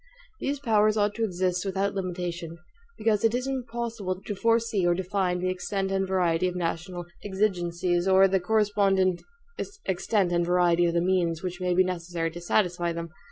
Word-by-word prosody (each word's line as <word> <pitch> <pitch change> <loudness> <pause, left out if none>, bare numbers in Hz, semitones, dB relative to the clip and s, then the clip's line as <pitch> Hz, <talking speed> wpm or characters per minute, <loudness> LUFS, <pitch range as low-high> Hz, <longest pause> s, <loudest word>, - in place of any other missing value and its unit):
These 280 +1 -1
powers 215 -4 +3
ought 205 0 +2
to 230 - -2
exist 180 -3 0
without 195 0 -1
limitation, 175 -3 -4 0.4
BECAUSE 215 -2 +1
IT 225 +1 +3
IS 250 +1 -1
IMPOSSIBLE 235 -7 -3
TO 210 - -4
FORESEE 230 -1 +1
OR 175 - +3
DEFINE 185 0 -1
THE 185 - 0
EXTENT 195 +1 -2
AND 195 0 0
VARIETY 180 -2 +1
OF 180 - -3
NATIONAL 175 +1 -3 0.2
EXIGENCIES, 180 -3 0
OR 190 0 +6
THE 190 0 +2
CORRESPONDENT 195 -2 +2 0.6
EXTENT 190 0 +1
AND 175 0 +2
VARIETY 175 0 +3
OF 170 - -1
THE 170 - +3
MEANS 175 -2 +1
WHICH 180 0 -4
MAY 180 -1 +1
BE 185 - +5
NECESSARY 170 -2 -3
TO 175 +1 -8
SATISFY 175 -2 +1
THEM. 170 0 -5
185 Hz, 170 wpm, -27 LUFS, 175-205 Hz, 0.6 s, OR